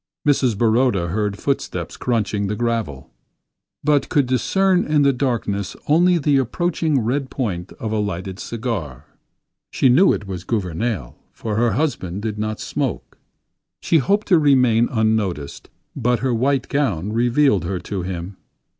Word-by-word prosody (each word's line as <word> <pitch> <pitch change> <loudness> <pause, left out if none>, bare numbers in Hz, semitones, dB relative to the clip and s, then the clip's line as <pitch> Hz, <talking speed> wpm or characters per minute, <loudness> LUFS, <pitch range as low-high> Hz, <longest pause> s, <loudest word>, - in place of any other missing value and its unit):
Mrs. 130 -6 +2
Baroda 110 -5 +2
heard 105 +2 -1
footsteps 140 +4 -3
crunching 105 -4 -1
the 105 - -2
gravel; 110 - -3 0.7
but 145 -1 +2
could 145 -2 +2
discern 185 +9 +2
in 150 -1 +2
the 140 -1 +4
darkness 115 -7 -2
only 175 +4 +4
the 145 -3 +2
approaching 155 +3 0
red 130 +4 -1
point 95 -9 -3
of 110 - -5
a 110 - 0
lighted 95 -1 -4
cigar. 95 - -4 0.6
She 130 - +2
knew 170 +11 +5
it - - -2
was 95 -3 -6
Gouvernail, 95 - -2 0.2
for 110 -2 -4
her 115 +1 +2
husband 105 - -2
did 110 -2 -3
not 110 0 -3
smoke. - - -4 0.6
She 165 - +2
hoped 200 +9 +1
to 175 -4 +6
remain 125 -6 +4
unnoticed, 110 - -1 0.3
but 125 -2 0
her 130 -1 0
white 130 +2 +1
gown 105 - -1
revealed 120 - +2
her 90 +2 -2
to 95 +1 -4
him. 90 +1 -6
115 Hz, 145 wpm, -21 LUFS, 100-140 Hz, 0.7 s, to